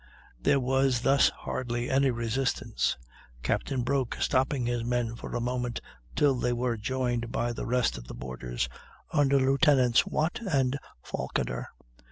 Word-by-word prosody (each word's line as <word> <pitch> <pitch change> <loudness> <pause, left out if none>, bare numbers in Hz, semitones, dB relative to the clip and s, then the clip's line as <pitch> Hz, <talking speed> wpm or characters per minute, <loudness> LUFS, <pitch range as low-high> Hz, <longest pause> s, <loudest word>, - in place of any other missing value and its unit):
There 140 - +3
was 130 -1 +2
thus 135 +2 +5
hardly 120 -1 -3
any 135 +1 +4
resistance, 120 +2 -1 0.5
Captain 130 -3 0
Broke 130 -1 0
stopping 130 -1 +1
his 120 -1 -1
men 120 -1 -1
for - - -7
a - - 0
moment 125 0 -2 0.4
till 145 -2 +4
they 125 -1 0
were 120 0 0
joined 120 +1 -1
by 120 0 -1
the - - -5
rest 125 - +1
of - - -12
the - - -8
boarders 60 -1 -4 0.5
under 140 -2 +4
Lieutenants 135 -2 +4
Watt 155 +3 0
and 140 - +1 0.3
Falkiner. - - -3
125 Hz, 145 wpm, -28 LUFS, 120-135 Hz, 0.5 s, thus